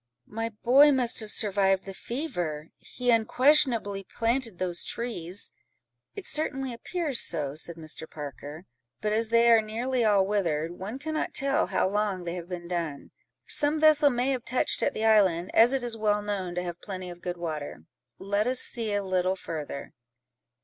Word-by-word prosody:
"My 225 +2 -4
boy 255 +7 +5
must 250 -4 +1
have 215 -2 -5
survived 195 -3 +2
the 195 - -7
fever: 175 - -4
he 245 -1 -2
unquestionably 230 -3 +3
planted 230 0 -1
those 175 -2 -2
trees." 205 -6 -3 0.6
"It 405 -3 -7
certainly 270 -4 -2
appears 300 +3 -2
so," 150 -5 +1
said 160 +2 -2
Mr. 160 0 -7
Parker; 150 +2 -8 0.3
"but 210 0 -1
as 225 0 +2
they 235 0 +5
are 225 -1 +6
nearly 235 +4 -2
all 205 -3 +4
withered, 170 -6 -1
one 190 +7 -6
cannot 310 +3 -3
tell 275 +2 +1
how - - +1
long 200 -2 -1
they 170 -1 -4
have 175 -1 -7
been 175 -1 -6
done. 165 -5 -4 0.3
Some 295 +1 +1
vessel 305 -1 +6
may 250 +1 0
have 255 -3 -2
touched 250 - 0
at 285 - 0
the 220 - -1
island, 190 -5 +3
as 230 +2 +6
it 270 -2 -1
is 240 -2 -1
well 210 -1 0
known 190 -4 -3
to 180 - -2
have 175 -1 -6
plenty 185 -3 -6
of 175 0 -12
good 180 0 -4
water. 155 - -5 0.3
Let 205 +3 -1
us 255 0 +2
see 230 -3 +1
a 205 0 0
little 185 0 0
further." 155 -6 -6
210 Hz, 175 wpm, -27 LUFS, 175-245 Hz, 0.6 s, are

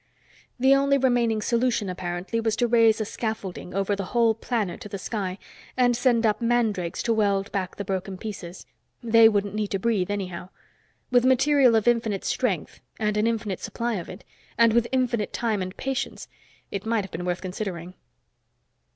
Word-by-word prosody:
The 265 +2 +5
only 275 0 +3
remaining 240 -5 +2
solution, 235 -3 +1
apparently, 180 +4 -3
was 225 -1 0
to 240 +1 +1
raise 230 -2 +4
a 215 - -1
scaffolding 205 -5 -5
over 195 +1 0
the 195 -1 -4
whole 230 -1 +5
planet 225 -3 -3
to 210 - -8
the 200 - -4
sky, 190 -2 -4 0.4
and 245 -1 +3
send 240 -1 +2
up 215 +1 +1
mandrakes 225 -7 0
to 230 - +2
weld 200 -2 +1
back 190 -2 -3
the 200 - -5
broken 190 0 -3
pieces. 185 -4 -8 0.4
They 230 -1 +6
wouldn't 205 -2 -1
need 215 -1 -1
to 195 - -2
breathe, 200 -2 0
anyhow. 185 -3 -4 0.6
With 245 -1 +4
material 260 -1 +4
of 220 +1 +1
infinite 225 -4 +1
strength - - -1 0.2
and 210 -2 0
an 210 +2 +2
infinite 220 -5 -2
supply 235 0 -3
of 170 - -7
it 185 - -10 0.3
and 230 -1 +5
with 235 0 +3
infinite 245 -5 0
time 220 -4 -1
and 185 0 -5
patience, 270 -1 -3 0.4
it 200 -1 -4
might 225 -2 0
have 190 - -10
been 170 - -5
worth 180 0 -2
considering. 180 -2 -5
220 Hz, 175 wpm, -25 LUFS, 195-235 Hz, 0.6 s, They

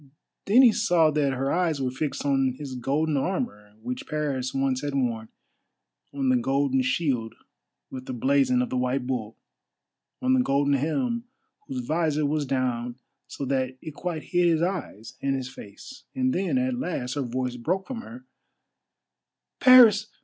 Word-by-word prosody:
Then 235 +7 +6
he 240 - +8
saw 175 -8 +3
that 145 -2 +1
her 135 +1 -1
eyes 170 -4 +1
were 130 -2 -1
fixed 140 +1 -3
on 135 -2 +1
his 140 -3 -7
golden 140 +4 0
armour 135 - -3
which 125 +1 -5
Paris 140 -4 -2
once 135 -1 0
had 145 -1 -3
worn, 115 -4 -1 0.8
on 135 -2 -1
the 130 - +4
golden 135 +1 +1
shield 125 -4 -1 0.6
with 130 0 -8
the - - -4
blazon 130 0 +2
of - - -5
the 130 - -1
White 125 +1 0
Bull, 115 -4 -4 0.8
on 255 0 +2
the 260 - +4
golden 140 - +1
helm, 235 - -1 0.4
whose 125 -2 -4
visor 155 0 0
was 145 0 -1
down 125 -2 -1 0.3
so 140 - -6
that 130 -1 -1
it 155 +1 -8
quite 165 -1 -4
hid 175 -1 +2
his 165 -1 +2
eyes 170 - -4
and 135 0 0
his 130 -1 -4
face—and 260 - -5
then 195 +8 0
at 255 -1 0
last 130 - -3
her 145 - -2
voice 125 0 -3
broke 180 +11 -2
from 255 -4 -6
her: 245 +2 -11 1.3
"_Paris! 230 -5 +7
140 Hz, 165 wpm, -26 LUFS, 130-175 Hz, 1.3 s, he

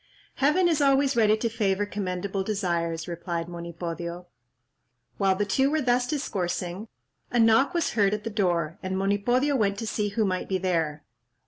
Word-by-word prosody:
"Heaven 300 +7 +3
is 320 -3 +2
always 275 0 +3
ready 215 -2 +4
to 230 - -1
favour 205 -3 0
commendable 195 -1 -3
desires," 170 -5 -2
replied 170 -1 -4
Monipodio. 170 0 -6 0.9
While 195 -2 +3
the 205 +2 0
two 265 +7 +2
were 310 +1 +1
thus 245 -2 +1
discoursing, 195 - -3 0.4
a 245 - -1
knock 225 +8 +4
was 340 - +1
heard 205 -2 +2
at 210 - -7
the 225 - -4
door, 175 -6 0
and 190 -1 -3
Monipodio 240 +9 +1
went 200 -5 +1
to 225 - -4
see 210 -1 -1
who 215 +1 0
might 185 -1 -2
be 190 - +1
there. 165 -5 -1
200 Hz, 165 wpm, -26 LUFS, 180-235 Hz, 0.9 s, ready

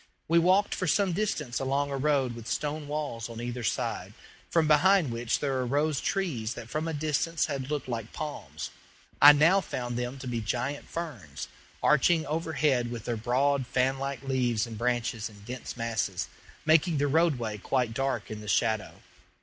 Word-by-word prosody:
We 170 +1 +5
walked 185 +4 +3
for 180 - -2
some 195 +2 +2
distance 155 - -1
along 140 +2 0
a - - -1
road 135 -3 +1
with 115 -1 -9
stone 150 0 -2
walls 145 -6 -3
on 115 -1 -7
either 120 +1 -4
side, - - -2 0.3
from 165 -2 +3
behind 160 0 +5
which 115 0 0
there 135 -2 -1
arose 145 +4 +1
trees 130 - -1
that 120 -1 -8
from 155 +2 -1
a - - -1
distance 155 +2 0
had 135 -3 -4
looked 150 -3 -2
like 115 -3 -4
palms. 150 -1 -6 0.5
I 145 - +12
now 165 +7 +5
found 120 -7 -4
them 125 +2 -3
to 130 - -8
be 120 -2 -2
giant 125 +6 -3
ferns, 115 - -6 0.3
arching 155 +2 +4
overhead 150 -5 0
with 120 -2 -6
their 120 - -1
broad 130 +4 +1
fanlike 135 +2 0
leaves 125 -4 +1
and 115 -1 -8
branches 120 -1 -1
in 105 -1 -15
dense 125 +3 -7
masses, 115 -2 -2 0.4
making 160 +1 +4
the 145 - +2
roadway 135 -8 +1
quite 125 0 0
dark 135 -4 -2
in 105 0 -6
the 105 - -10
shadow. 110 +1 0
135 Hz, 175 wpm, -28 LUFS, 120-150 Hz, 0.5 s, I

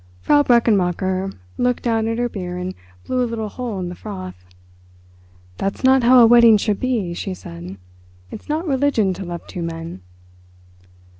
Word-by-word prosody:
Frau 290 - +4
Brechenmacher 195 -6 +1 0.3
looked 245 0 0
down 225 -2 0
at 225 0 -1
her 245 0 0
beer 180 -5 -6
and 180 +1 -4 0.3
blew 255 -1 0
a - - 0
little 220 -2 -4
hole 240 -2 -5
in 180 - -3
the - - -6
froth. 185 - -8 1.2
"That's 195 +5 -3
not 260 0 +5
how 250 +2 +6
a 235 - +8
wedding 230 -1 +7
should 205 0 -1
be," 230 -9 -1
she 185 +2 -4
said; 90 - -9 0.5
"it's - - -10
not 315 +4 -1
religion 265 -8 +1
to 190 - -7
love 175 -1 -7
two 180 - -7
men." 165 - -6
210 Hz, 165 wpm, -20 LUFS, 180-245 Hz, 1.2 s, a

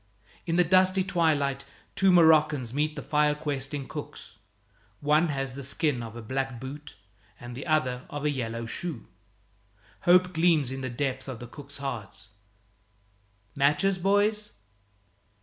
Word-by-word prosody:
In 165 - 0
the 180 - +5
dusty 185 +2 +4
twilight 150 -7 +1 0.3
two 195 -1 +4
Moroccans 155 -7 +4
meet 150 +2 0
the 145 - -6
fire 150 0 +2
questing 145 -2 -4
cooks. - - -9 0.6
One 150 +3 +3
has 135 -3 -3
the 140 - -7
skin 140 -1 -1
of 115 -1 -8
a 120 - -8
black 130 +1 -3
boot 140 +3 -8 0.4
and 120 0 -8
the 130 +6 -7
other 130 -5 0
of 145 0 -5
a 150 - +2
yellow 115 -3 -3
shoe. 150 +3 -5 1.0
Hope 180 +1 +5
gleams 160 -5 +3
in 135 0 -5
the 130 - -3
depths 130 +1 -3
of 130 -4 -6
the 120 - -8
cooks' 140 +3 -11
hearts. 110 -7 -6 1.2
"Matches, 150 +7 +2
boys?" 205 - +1
145 Hz, 145 wpm, -27 LUFS, 130-165 Hz, 1.2 s, the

